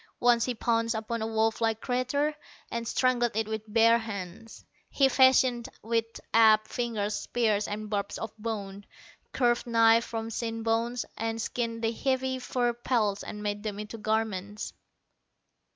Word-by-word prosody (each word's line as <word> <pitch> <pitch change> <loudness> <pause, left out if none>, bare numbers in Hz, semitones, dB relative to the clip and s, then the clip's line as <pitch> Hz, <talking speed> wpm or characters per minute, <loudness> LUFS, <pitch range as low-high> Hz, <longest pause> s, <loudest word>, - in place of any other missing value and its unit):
Once 240 -1 +4
he 250 - -2
pounced 230 0 0
upon 220 +1 -3
a 220 - -1
wolf 220 0 0
like 225 -1 +1
creature, 270 +5 0 0.4
and 235 0 -3
strangled 245 -3 +1
it 220 -1 0
with 220 -1 -5
bare 230 +1 +5
hands. 215 0 -8 0.2
He 275 - +4
fashioned 260 -2 +4
with 230 0 -1
apt 215 -1 +5
fingers 220 -4 -2
spears 215 -3 0
and 210 +1 -4
barbs 200 -1 -2
of 225 -1 -6
bone, 205 -3 -5 0.4
curved 240 -1 +1
knives 230 0 +4
from 225 0 -4
shin 225 0 -3
bones, 230 +2 0
and 225 0 -2
skinned 230 0 -3
the 225 - +2
heavy 260 +1 -1
fur 245 -1 0
pelts 230 -4 0
and 210 0 -7
made 205 0 -2
them 210 -2 -4
into 210 +2 -7
garments. 210 -1 -2
225 Hz, 150 wpm, -28 LUFS, 215-240 Hz, 0.4 s, bare